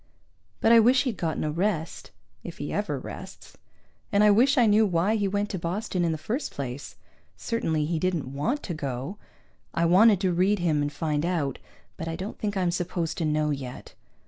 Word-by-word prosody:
But 225 Hz, -, +4 dB
I 230 Hz, -, +8 dB
wish 250 Hz, +4 st, +5 dB
he'd 250 Hz, -6 st, -2 dB
gotten 160 Hz, -2 st, -2 dB
a 155 Hz, -, -1 dB
rest, 170 Hz, -1 st, -2 dB, 0.3 s
if -, -, -8 dB
he -, -, -5 dB
ever -, -, -1 dB
rests! -, -, -10 dB, 0.6 s
And 205 Hz, 0 st, +4 dB
I 210 Hz, -, +7 dB
wish 260 Hz, +7 st, +4 dB
I 245 Hz, -, +6 dB
knew 215 Hz, +1 st, +5 dB
why 190 Hz, +2 st, +2 dB
he 205 Hz, -2 st, +1 dB
went 205 Hz, +1 st, -1 dB
to 190 Hz, -, -3 dB
Boston 180 Hz, +2 st, -2 dB
in 170 Hz, -, +1 dB
the 160 Hz, -, -2 dB
first 225 Hz, -, -3 dB
place. 135 Hz, 0 st, -6 dB, 0.4 s
Certainly 165 Hz, -10 st, -1 dB
he 160 Hz, +1 st, -1 dB
didn't 160 Hz, -7 st, -1 dB
want 235 Hz, -, -1 dB
to 175 Hz, -, -4 dB
go. 140 Hz, +6 st, -5 dB, 0.6 s
I 170 Hz, -, +2 dB
wanted 195 Hz, +4 st, +6 dB
to 185 Hz, -3 st, +1 dB
read 190 Hz, +4 st, +2 dB
him 165 Hz, -5 st, +1 dB
and 145 Hz, 0 st, -1 dB
find 150 Hz, -1 st, -1 dB
out, 165 Hz, -7 st, -1 dB, 0.4 s
but 165 Hz, -, -5 dB
I 165 Hz, -, -3 dB
don't 190 Hz, +5 st, -6 dB
think 205 Hz, -2 st, -2 dB
I'm 180 Hz, -2 st, +1 dB
supposed 170 Hz, -2 st, -2 dB
to 165 Hz, -, 0 dB
know 150 Hz, 0 st, +1 dB
yet. 130 Hz, -3 st, -6 dB
175 Hz, 200 wpm, -26 LUFS, 155-210 Hz, 0.6 s, I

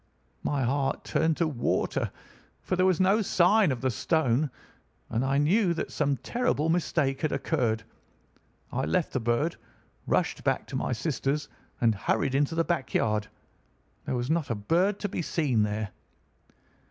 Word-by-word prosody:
My 140 Hz, -2 st, 0 dB
heart 135 Hz, +2 st, 0 dB
turned 160 Hz, -1 st, +1 dB
to 170 Hz, -, +2 dB
water, 130 Hz, -6 st, -1 dB, 0.5 s
for -, -, -1 dB
there 185 Hz, +1 st, +3 dB
was 185 Hz, -4 st, +2 dB
no 195 Hz, +4 st, +4 dB
sign 185 Hz, -1 st, +4 dB
of 125 Hz, -, -3 dB
the 130 Hz, -1 st, +1 dB
stone, 145 Hz, -, +1 dB, 0.6 s
and 115 Hz, +3 st, 0 dB
I 135 Hz, +1 st, +1 dB
knew 175 Hz, +5 st, +3 dB
that -, -, -3 dB
some 140 Hz, -2 st, 0 dB
terrible 235 Hz, -, 0 dB
mistake 155 Hz, -5 st, +1 dB
had 155 Hz, -, 0 dB
occurred. 115 Hz, -8 st, 0 dB, 0.9 s
I 130 Hz, +2 st, -1 dB
left 180 Hz, -3 st, 0 dB
the 130 Hz, -, +1 dB
bird, 120 Hz, +8 st, 0 dB, 0.5 s
rushed -, -, 0 dB
back -, -, 0 dB
to -, -, -5 dB
my -, -, -1 dB
sister's, 145 Hz, +3 st, -1 dB, 0.3 s
and 115 Hz, -2 st, +4 dB
hurried 130 Hz, +6 st, 0 dB
into 145 Hz, +4 st, +1 dB
the 165 Hz, -, +2 dB
back 170 Hz, -7 st, -2 dB
yard. 105 Hz, -2 st, +1 dB, 0.8 s
There -, -, -1 dB
was 125 Hz, +4 st, -1 dB
not 160 Hz, -2 st, 0 dB
a 115 Hz, -, 0 dB
bird 175 Hz, -, +1 dB
to 205 Hz, -, 0 dB
be 180 Hz, -, -3 dB
seen 145 Hz, -9 st, +1 dB
there. 105 Hz, -1 st, -1 dB
145 Hz, 165 wpm, -28 LUFS, 125-170 Hz, 0.9 s, no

